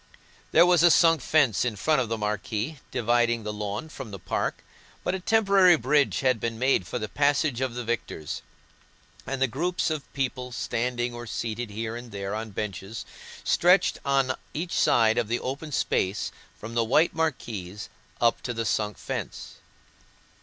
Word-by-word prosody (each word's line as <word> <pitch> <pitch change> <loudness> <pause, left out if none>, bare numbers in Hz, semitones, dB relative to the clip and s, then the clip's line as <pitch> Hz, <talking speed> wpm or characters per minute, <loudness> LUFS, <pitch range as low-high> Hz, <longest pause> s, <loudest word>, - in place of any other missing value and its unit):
There 165 +2 +7
was 180 -2 +5
a 175 - +7
sunk 165 -2 +5
fence 135 -9 +3
in 120 -3 -1
front 150 +7 +2
of 120 - -3
the 115 - -1
marquee, 105 - -3
dividing 120 0 +1
the 105 0 -4
lawn 105 +6 -4
from 135 -6 -8
the 100 - -7
park, 85 - -2 0.4
but - - 0
a 190 - -2
temporary 195 -3 +5
bridge 140 +1 +2
had 130 -4 +2
been 115 +1 -3
made 125 -7 +2
for - - -3
the 110 -3 -3
passage 140 -1 +1
of 130 -3 -1
the 125 - -3
victors, 110 -10 -4 0.9
and 135 - -2
the 135 - +4
groups 170 +7 -1
of 155 -3 -4
people 130 -2 -2
standing, 120 +1 -2
or 120 0 -7
seated 115 0 -3
here 110 +2 -4
and 120 -1 -8
there 100 0 -4
on 110 +1 -4
benches, 105 +2 -5 0.4
stretched 180 +2 +4
on 135 -2 +2 0.2
each 170 +4 -3
side 110 -1 +4
of 120 - -1
the 120 +2 0
open 140 +4 -5
space 100 -6 0 0.3
from 115 +2 -7
the 115 0 +2
white 140 +9 +3
marquees 110 - -3 0.3
up 115 -1 +2
to 120 - -4
the 115 0 -2
sunk 105 0 -1
fence. - - -6
120 Hz, 175 wpm, -26 LUFS, 110-145 Hz, 0.9 s, There